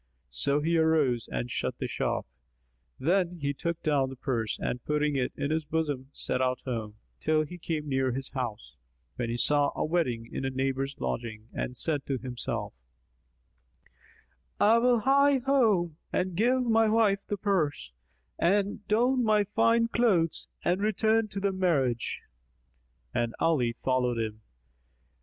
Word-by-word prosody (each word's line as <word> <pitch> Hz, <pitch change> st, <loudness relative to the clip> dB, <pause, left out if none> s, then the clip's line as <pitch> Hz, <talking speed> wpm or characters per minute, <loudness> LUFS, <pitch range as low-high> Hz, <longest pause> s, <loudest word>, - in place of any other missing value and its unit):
So 140 Hz, -, 0 dB
he 165 Hz, +2 st, +1 dB
arose 150 Hz, -7 st, +2 dB
and -, -, -3 dB
shut -, -, -2 dB
the -, -, -3 dB
shop; -, -, -2 dB, 0.7 s
then 175 Hz, +3 st, +1 dB
he 140 Hz, -1 st, -1 dB
took 170 Hz, +4 st, -3 dB
down 140 Hz, -3 st, +2 dB
the 135 Hz, -, -8 dB
purse 120 Hz, -4 st, -2 dB
and 125 Hz, -, -3 dB
putting 150 Hz, -1 st, 0 dB
it 130 Hz, -2 st, 0 dB
in 140 Hz, -, -2 dB
his 160 Hz, 0 st, 0 dB
bosom 145 Hz, -4 st, -2 dB
set 130 Hz, -, -2 dB
out 130 Hz, 0 st, +1 dB
home, 110 Hz, -5 st, -4 dB, 0.2 s
till 155 Hz, 0 st, +2 dB
he 175 Hz, +3 st, -9 dB
came 155 Hz, -2 st, -3 dB
near 130 Hz, -2 st, +1 dB
his 135 Hz, +2 st, -4 dB
house, 120 Hz, -5 st, -5 dB, 0.4 s
when 120 Hz, -2 st, -2 dB
he 120 Hz, -, -2 dB
saw 145 Hz, +2 st, +3 dB
a -, -, 0 dB
wedding 130 Hz, -9 st, 0 dB
in -, -, -3 dB
a 135 Hz, -, 0 dB
neighbour's 135 Hz, +1 st, -2 dB
lodging 110 Hz, -2 st, -4 dB
and 125 Hz, -, -4 dB
said 150 Hz, -4 st, -1 dB
to 135 Hz, -, 0 dB
himself, 125 Hz, -1 st, -4 dB, 1.9 s
"I 225 Hz, +3 st, +5 dB
will 240 Hz, -1 st, +3 dB
hie 280 Hz, +3 st, +5 dB
me 260 Hz, -, -1 dB
home 215 Hz, -, +2 dB
and 185 Hz, -1 st, -1 dB
give 250 Hz, +6 st, +3 dB
my 225 Hz, -2 st, +3 dB
wife 215 Hz, -3 st, +3 dB
the 205 Hz, -, -2 dB
purse 180 Hz, -, 0 dB, 0.5 s
and 200 Hz, +4 st, +1 dB
don 245 Hz, +4 st, +3 dB
my 215 Hz, -2 st, +4 dB
fine 230 Hz, +3 st, +2 dB
clothes 205 Hz, -9 st, +1 dB, 0.2 s
and 180 Hz, +3 st, +2 dB
return 220 Hz, +1 st, +2 dB
to 200 Hz, -1 st, -5 dB
the 200 Hz, 0 st, +1 dB
marriage." 145 Hz, -11 st, 0 dB, 0.9 s
And 120 Hz, -1 st, -1 dB
Ali 140 Hz, -8 st, +2 dB
followed 125 Hz, 0 st, 0 dB
him. 110 Hz, -1 st, -3 dB
155 Hz, 155 wpm, -28 LUFS, 130-200 Hz, 1.9 s, I